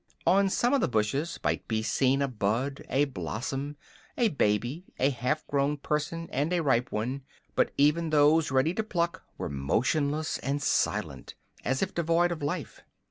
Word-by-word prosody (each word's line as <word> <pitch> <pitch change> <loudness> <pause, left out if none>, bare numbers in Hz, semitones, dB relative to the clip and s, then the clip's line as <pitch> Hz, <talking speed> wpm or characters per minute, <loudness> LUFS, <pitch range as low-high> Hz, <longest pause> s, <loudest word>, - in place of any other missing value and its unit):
On 195 +1 +4
some 240 +7 +1
of 280 - +3
the - - +2
bushes 135 +9 0
might - - -1
be 110 -1 -1
seen 135 +4 +2
a - - +1
bud, 125 +4 -1
a 140 +2 +3
blossom, 135 - -4 0.4
a 235 -3 +3
baby, 120 - 0
a 135 +2 +3
half 130 +5 -1
grown 140 +1 0
person 150 +3 -2
and 145 +6 0
a 175 -2 +1
ripe 125 -3 +2
one; 125 +6 -2 0.3
but - - +2
even 150 +3 +3
those 150 +1 +4
ready 135 +5 +2
to 220 - -1
pluck 175 -3 -1 0.2
were - - -3
motionless 140 - 0
and 140 +2 -1
silent, 140 - -1 0.3
as 130 +5 0
if 195 - -3
devoid 170 +1 +2
of 170 - -4
life. 145 0 -4
145 Hz, 170 wpm, -28 LUFS, 130-165 Hz, 0.4 s, On